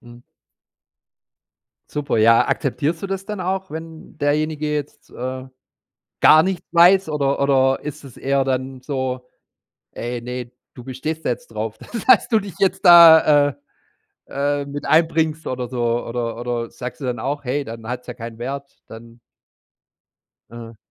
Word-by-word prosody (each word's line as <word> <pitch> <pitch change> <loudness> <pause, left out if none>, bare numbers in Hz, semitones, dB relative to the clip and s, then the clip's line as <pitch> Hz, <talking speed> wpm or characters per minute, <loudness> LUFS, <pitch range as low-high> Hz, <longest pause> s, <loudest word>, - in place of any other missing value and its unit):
Mhm. 120 0 -15 1.7
Super, 145 -5 -2
ja. 115 +1 +5
Akzeptierst 155 +4 -1
du - - -2
das 195 0 -4
dann 210 -2 -6
auch, 190 +1 -3
wenn 160 0 -10
derjenige 150 +1 -1
jetzt, 145 -1 -6
äh, 130 +1 -6 0.7
gar 155 +1 +7
nichts 190 -2 -3
weiß 180 +2 +5
oder 140 -2 -1
oder 135 -1 +2
ist 150 0 -7
es 130 -4 -13
eher 135 0 0
dann 130 0 -3
so: 130 -2 -4 0.7
„Ey, 120 0 -5
ne, 125 0 -6 0.2
du 125 - -12
bestehst 150 +6 -5
da - - +1
jetzt 120 -1 -4
drauf, 110 0 -5 0.3
dass - - +6
du 220 - +4
dich 195 -4 -9
jetzt 190 0 0
da, 160 -4 +8
äh - - -11 0.7
äh, 145 +1 -1
mit 140 +1 -7
einbringst 160 -1 +2
oder 125 -1 -3
so“ 120 -1 -1
oder 115 -1 -3
oder 120 -1 -3
sagst 125 -1 -8
du 135 - -5
dann 120 -2 -3
auch: 140 +4 -3
„Hey, 140 +3 -1
dann 115 -1 -9
hat's 125 0 -6
ja 125 - -6
keinen 115 0 -9
Wert, 140 +3 -5 0.2
dann.” 115 +1 -13 1.3
Aha. 115 -1 -11
135 Hz, 155 wpm, -20 LUFS, 120-155 Hz, 1.7 s, da